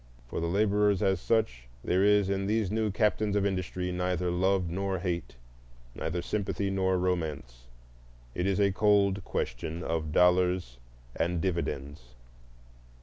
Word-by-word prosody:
For - - -5
the 85 - -1
laborers 100 +1 +2
as 95 -1 +2
such, 85 - 0 0.2
there 90 +2 +2
is 105 -1 +4
in 95 0 -1
these 105 -2 0
new 110 0 0
captains 105 0 +1
of 100 -1 +2
industry 90 -1 -2
neither 90 0 -1
love 95 +1 +1
nor 95 +2 -2
hate, 85 -7 -3 0.6
neither 80 +5 -3
sympathy 100 -1 -2
nor 95 -1 +1
romance; 80 -9 -3 0.7
it 90 +6 -1
is 100 0 +1
a 100 -1 +3
cold 100 -1 +2
question 80 +8 -4
of 80 -2 -2
dollars 90 -7 +2 0.4
and 85 +1 0
dividends. 70 -8 -4
90 Hz, 140 wpm, -29 LUFS, 85-100 Hz, 0.7 s, is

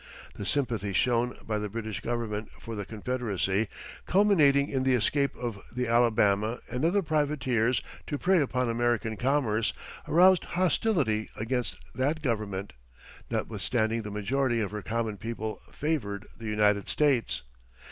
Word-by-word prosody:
The 100 - -6
sympathy 115 -8 0
shown 120 +3 +1
by 110 -1 -1
the 105 0 -3
British 110 0 -4
Government 115 -3 -3
for 115 - -7
the 100 -2 -5
Confederacy, 110 -3 -1 0.4
culminating 155 -9 +5
in 135 -3 -1
the 130 -1 +3
escape 140 +5 +1
of 115 -5 -5
the 125 0 -2
Alabama 115 -2 +3
and 125 +3 -2
other 190 +5 +3
privateers 135 -6 +1 0.2
to 145 - -2
prey 185 +4 +3
upon 125 -2 0
American 115 -1 0
commerce, 115 -4 +1 0.3
aroused 185 +2 +5
hostility 160 - +1
against 120 +2 -2 0.2
that 145 +5 -1
Government, 105 - -2 0.6
notwithstanding 110 +1 0
the 105 - -6
majority 120 +4 0
of 105 -3 -1
her 105 0 -4
common 115 -1 -2
people 110 0 -5
favored 110 -10 -2
the 115 - -8
United 105 -1 +2
States. 120 - +1
115 Hz, 135 wpm, -28 LUFS, 105-140 Hz, 0.6 s, culminating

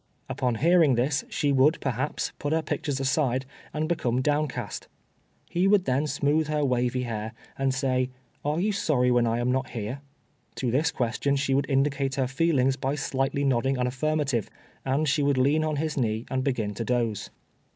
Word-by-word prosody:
Upon 125 -2 -1
hearing 160 0 +4
this, 135 +4 +1
she 145 - 0
would, 140 +4 +4
perhaps, 135 +2 -2
put 145 +1 -1
her 160 0 +1
pictures 145 -2 -2
aside, 135 -1 +1 0.3
and 155 +1 -2
become 130 -8 0
downcast. 150 -1 -2 0.6
He 180 +3 +2
would 195 -2 +4
then 135 +4 +1
smooth 145 +2 +1
her 150 -1 0
wavy 125 -1 0
hair, 110 -1 -4 0.2
and 135 0 0
say, 130 -1 0 0.3
"Are 150 +3 0
you 210 +4 +1
sorry 140 -10 +1
when 120 -1 +3
I 115 +1 +1
am 120 +1 +1
not 130 0 -1
here?" 120 +4 -5 0.5
To 125 -3 -1
this 150 +6 +2
question 140 -1 0
she 135 -1 0
would 140 +1 +1
indicate 135 -1 +1
her 135 -2 +1
feelings 135 -1 +1
by 135 +1 -1
slightly 140 0 -1
nodding 135 0 +1
an 125 - 0
affirmative, 135 -2 -1 0.3
and 140 +4 0
she 145 +1 +2
would 140 -1 +2
lean 145 +5 +3
on 155 -1 -1
his 155 0 -2
knee 110 -3 0
and 130 0 0
begin 115 -7 -1
to 110 - -4
doze. 115 -3 -1
135 Hz, 180 wpm, -26 LUFS, 125-150 Hz, 0.6 s, hearing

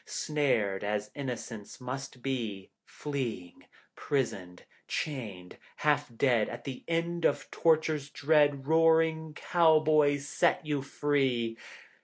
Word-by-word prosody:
Snared 130 -14 0
as 105 0 -2
innocence 120 -6 -6
must 130 0 -6
be, 115 -8 -3
Fleeing, 125 -12 -5 0.3
prisoned, 95 -10 -3 0.2
chained, 105 - -5 0.2
half 145 -3 +1
dead— 120 -5 +3
At - - -7
the 135 -3 -7
end 170 0 -1
of - - 0
tortures 155 -3 +1
dread 145 -2 +2
Roaring 160 0 +3
cowboys 155 -4 +3
set 170 +2 +1
you 145 -2 -1
free. 135 -5 0
140 Hz, 105 wpm, -30 LUFS, 115-155 Hz, 0.3 s, dead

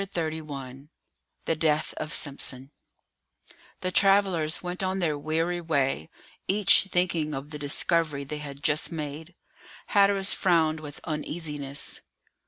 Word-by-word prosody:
CHAPTER 170 -5 -2
XXXI 140 -3 -7 0.6
THE 165 - +1
DEATH 155 -1 +1
OF 155 - -3
SIMPSON 135 -3 -2 1.1
The 185 - -1
travellers 190 -6 +3
went 180 +1 -3
on 190 0 0
their 165 -5 +1
weary 165 +4 -1
way, 140 - 0 0.4
each 200 0 +5
thinking 170 -5 0
of 140 +3 -6
the 150 - -6
discovery 145 0 +1
they 150 +2 -5
had 140 -1 -8
just 155 +1 +1
made. 155 +2 -6 0.5
Hatteras 200 -1 +4
frowned 160 -4 +3
with 150 -2 -9
uneasiness. 150 -3 -4
155 Hz, 125 wpm, -27 LUFS, 145-175 Hz, 1.1 s, each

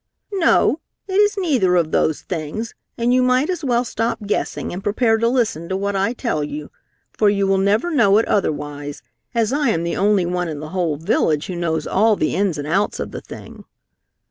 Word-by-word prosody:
"No, 330 -4 +3 0.3
it 380 - -5
is 410 +1 +3
neither 260 - +2
of 165 -3 +1
those 155 - +1
things, 180 +7 -4 0.2
and 240 +1 +2
you 255 - +4
might 255 +6 +2
as 350 -3 -4
well 245 -3 +2
stop 225 -1 -2
guessing 205 - -2
and 185 +2 -6
prepare 225 +2 +2
to 230 - +2
listen 225 -10 0
to 190 - -1
what 200 +1 -2
I 195 +4 +1
tell 230 - -2
you, 150 0 -6 0.4
for 210 - +2
you 200 -1 +1
will 195 0 +2
never 210 - +1
know 210 -9 +4
it 225 - +2
otherwise, 145 -5 -2 0.3
as 230 +1 +1
I 290 -2 +2
am 165 -6 0
the 170 - -2
only 200 -3 +3
one 180 0 -1
in 155 -3 -5
the 155 +1 -7
whole 170 -4 -1
village 155 -2 +1
who 185 - -5
knows 160 -3 -1
all 215 +3 +3
the 155 - -1
ins 195 -4 0
and 145 - -4
outs 195 +6 0
of - - -4
the - - -6
thing." - - -11
200 Hz, 210 wpm, -20 LUFS, 165-235 Hz, 0.4 s, you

